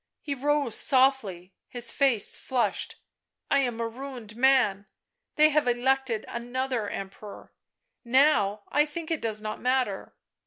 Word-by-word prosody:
He 290 - -4
rose 280 -2 0
softly, 255 - +1
his 240 -1 -1
face 265 -7 +2
flushed. 255 -2 -1 0.3
" - - -43
I 280 - +4
am 245 -4 -1
a 230 - -1
ruined 240 -3 -8
man. 240 -6 +3 0.5
They 305 0 +5
have 300 -3 +1
elected 245 -2 0
another 245 -2 -3
Emperor. 195 +1 -9 0.5
Now 235 -6 +3
I 295 +2 +2
think 325 +2 -6
it 320 - -1
does 215 -1 +1
not 215 0 -5
matter." 250 -6 -1
250 Hz, 140 wpm, -27 LUFS, 215-275 Hz, 0.5 s, They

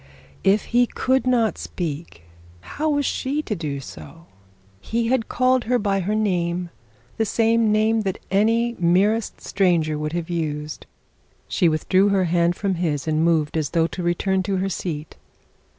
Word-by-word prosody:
If 195 +2 +3
he 245 0 +4
could 260 +2 0
not 235 -4 +2
speak, 150 - -5 0.4
how 305 - -3
was 290 -1 +1
she 285 +5 -1
to 210 - -3
do 150 -5 -4
so? 165 +4 -11 0.5
He 230 - -1
had 255 -3 0
called 255 0 +2
her 250 +2 +2
by 200 -3 0
her 200 +3 -1
name, 175 -4 -1 0.5
the 225 - +2
same 225 +1 +2
name 220 +1 +2
that 195 -3 -2
any 230 +4 +2
merest 195 +6 +1
stranger 170 -6 +1
would 150 +1 -3
have 170 -1 -3
used! 155 -3 -4 0.6
She 175 -4 +2
withdrew 185 +5 +2
her 195 -2 +2
hand 170 0 +2
from 195 +1 -1
his, 150 -4 -1
and 155 0 +1
moved 160 -3 +1
as 155 -3 0
though 165 +1 +2
to 180 - -5
return 185 +2 0
to 195 +1 -2
her 190 +1 -1
seat. 155 -5 -5
190 Hz, 165 wpm, -22 LUFS, 165-225 Hz, 0.6 s, he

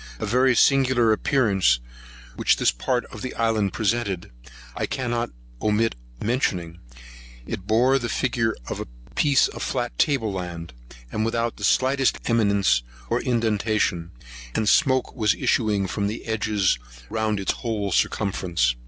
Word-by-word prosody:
The - - -3
very 125 +4 +3
singular 130 -3 +4
appearance 100 - +2 0.6
which - - +2
this - - +3
part 120 - -1
of - - -8
the 130 - -5
island 110 -4 +1
presented, 105 - -1 0.4
I - - -2
cannot 120 -2 -2 0.3
omit 110 +2 +2 0.3
mentioning; 90 -8 -1 0.7
it 95 +8 -6
bore 125 +5 +4
the 120 -2 -3
figure 115 +1 0
of - - -4
a - - -5 0.3
piece 140 -2 +4
of - - -8
flat - - -2
table 120 -8 +1
land, 85 -4 -6 0.4
without 115 +1 -1
the 105 - -9
slightest 130 +4 +2
eminence 100 - +3 0.3
or - - +1
indentation, 110 -7 0 0.5
and 110 - 0
smoke 130 0 +3
was 110 -5 +2
issuing 105 -4 +1
from 100 +2 -2
the 110 +3 -5
edges, 105 - +1 0.3
round 110 -2 0
its 95 - 0
whole 105 -4 -3
circumference. 85 -10 +1
110 Hz, 135 wpm, -24 LUFS, 100-120 Hz, 0.7 s, singular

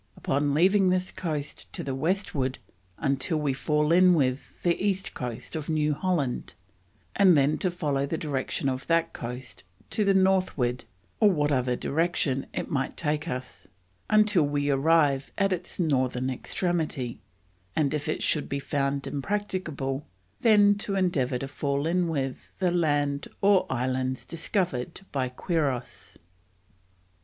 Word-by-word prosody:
Upon 140 +1 0
leaving 190 +4 +4
this 185 +1 0
coast 150 -5 -4
to - - -4
the 135 - -3
Westward 140 -4 -1 0.4
until 140 +4 0
we 145 -3 0
fall 150 +3 +1
in 180 +1 +6
with 130 -3 0
the 175 -1 +3
East 195 -2 0
coast 125 +2 -6
of 155 -1 -4
New 150 -1 +2
Holland, 145 -6 -1 0.6
and 185 -5 +6
then 140 +2 +2
to 185 - +1
follow 145 -6 -1
the 160 - -2
direction 140 -3 -2
of 130 0 -2
that 165 0 +2
coast 120 -7 -7 0.3
to 215 - +1
the 195 -1 +3
Northward 185 -10 +2 0.3
or 215 - +6
what 150 -5 +1
other 125 -2 +1
direction 145 -3 0
it - - -3
might 135 -2 -2
take 150 0 -1
us, 130 -5 -6 0.4
until 215 -4 +4
we 145 -1 +1
arrive 140 -1 +3
at 195 -1 +2
its 180 +1 -5
Northern 130 -5 +1
extremity; 155 -3 -2 0.6
and 150 -2 +1
if 150 0 -2
it - - -1
should 150 - +1
be 140 - -1
found 140 0 -1
impracticable 150 -5 -3 0.3
then 205 -3 +5
to 200 -1 -3
Endeavour 150 -10 +1
to 135 - -5
fall 140 +1 -2
in 175 +1 +1
with 135 -5 -2 0.2
the 185 -2 +1
Land 145 -4 +1
or 195 -1 +4
Islands 130 0 -1
discovered 170 - -2
by 130 -2 -1
Quiros." 135 -2 -3
150 Hz, 145 wpm, -27 LUFS, 135-180 Hz, 0.6 s, in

